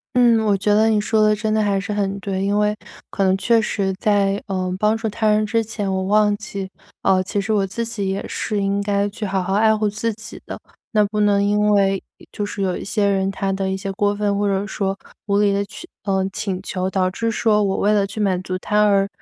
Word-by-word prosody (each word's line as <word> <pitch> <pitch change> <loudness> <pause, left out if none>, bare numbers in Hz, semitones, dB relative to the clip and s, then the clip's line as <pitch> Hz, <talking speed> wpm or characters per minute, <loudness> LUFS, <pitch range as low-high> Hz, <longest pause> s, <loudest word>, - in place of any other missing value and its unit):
嗯， 240 -2 +5
我 205 -2 +2
觉 205 +2 +1
得 215 +1 +4
你 215 -1 +3
说 215 +1 +1
得 215 0 +4
真 215 +1 -1
的 220 - +2
还 200 -2 +1
是 205 +2 -4
很 200 -1 -1
对。 195 -1 -3
因 200 +1 +1
为， 210 0 +2 0.4
可 195 - -1
能 190 0 +3
确 230 +3 +3
实 195 -3 -1
在， 200 -1 +1
呃， 185 -1 -2
帮 215 +2 +2
助 225 - -3
他 215 +1 0
人 215 0 +3
之 225 +1 0
前， 210 -3 -3
我 190 0 -1
忘 210 +1 +3
记， 200 -2 -6 0.4
呃， 185 -1 +3
其 200 - -2
实 210 +2 -1
我 200 -2 +2
自 230 +5 -3
己 210 -4 -3
也 195 +1 -3
是 210 - -2
应 200 +1 0
该 200 0 0
去 215 +2 -8
好 190 -2 -1
好 190 +2 -2
爱 220 +2 +4
护 215 0 +1
自 220 +3 -2
己 225 +1 -11
的。 - - -6 0.3
那 210 -1 +4
不 210 +1 -3
能 205 -1 +3
因 205 +1 +2
为， 195 -2 +2 0.2
呃， - - -17
就 210 - -4
是 205 -1 -3
有 185 -2 0
一 - - -6
些 205 0 0
人 195 -1 +1
他 195 0 -2
的 190 0 -2
一 190 - -1
些 195 0 -4
过 205 +1 0
分， 205 -1 0
或 205 0 0
者 195 0 0
说 195 -1 -2 0.3
无 200 0 +2
理 205 -1 +3
的 200 0 0
请 345 +11 -11 0.2
呃， 190 -1 +1
请 190 -3 -3
求， 185 -1 -2
导 185 -1 0
致 230 +4 -2
说 215 -1 +2
我 195 -1 0
为 210 +1 +2
了 200 -2 +2
去 200 +2 -8
满 190 -3 +1
足 185 0 -4
他 210 +3 +1
而 200 -1 +3
200 Hz, 270 characters per minute, -21 LUFS, 195-210 Hz, 0.4 s, 嗯